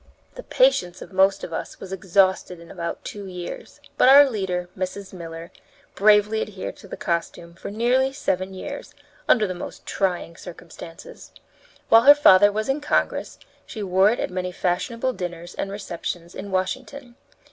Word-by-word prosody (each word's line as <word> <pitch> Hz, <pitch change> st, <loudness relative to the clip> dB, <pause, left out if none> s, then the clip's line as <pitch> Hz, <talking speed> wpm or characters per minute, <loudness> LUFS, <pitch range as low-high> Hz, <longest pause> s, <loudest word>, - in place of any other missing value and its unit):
The -, -, -8 dB
patience -, -, +1 dB
of -, -, -15 dB
most 195 Hz, +1 st, +3 dB
of 165 Hz, -, -6 dB
us -, -, -6 dB
was 190 Hz, 0 st, -8 dB
exhausted 190 Hz, -1 st, +1 dB
in 170 Hz, 0 st, -13 dB
about 170 Hz, -2 st, -5 dB
two 205 Hz, -1 st, -7 dB
years; 180 Hz, -1 st, -8 dB, 0.2 s
but -, -, +6 dB
our 280 Hz, +1 st, +9 dB
leader, 190 Hz, -7 st, -3 dB
Mrs. 190 Hz, +1 st, -5 dB
Miller, 165 Hz, -1 st, -8 dB, 0.4 s
bravely 210 Hz, +1 st, +4 dB
adhered 195 Hz, -3 st, -6 dB
to -, -, -14 dB
the -, -, -8 dB
costume 170 Hz, -1 st, -3 dB
for 170 Hz, -, -8 dB
nearly 245 Hz, +5 st, +1 dB
seven 190 Hz, -9 st, -2 dB
years, 185 Hz, -, -8 dB, 0.3 s
under 220 Hz, -4 st, +5 dB
the 185 Hz, -, -3 dB
most 175 Hz, -, -9 dB
trying 180 Hz, -3 st, -2 dB
circumstances. 170 Hz, -1 st, -11 dB, 0.6 s
While 225 Hz, -, +8 dB
her 285 Hz, +4 st, +9 dB
father 205 Hz, -8 st, +6 dB
was 215 Hz, +1 st, -2 dB
in 270 Hz, +2 st, -1 dB
Congress, 290 Hz, -, -1 dB, 0.3 s
she 215 Hz, -, -6 dB
wore 190 Hz, +1 st, +4 dB
it 235 Hz, -, -1 dB
at -, -, -2 dB
many 180 Hz, 0 st, -3 dB
fashionable 230 Hz, +9 st, -1 dB
dinners 175 Hz, -3 st, -6 dB
and 195 Hz, -, -4 dB
receptions 175 Hz, -3 st, -6 dB
in 200 Hz, -, -7 dB
Washington. 240 Hz, +7 st, -3 dB
190 Hz, 165 wpm, -23 LUFS, 180-220 Hz, 0.6 s, our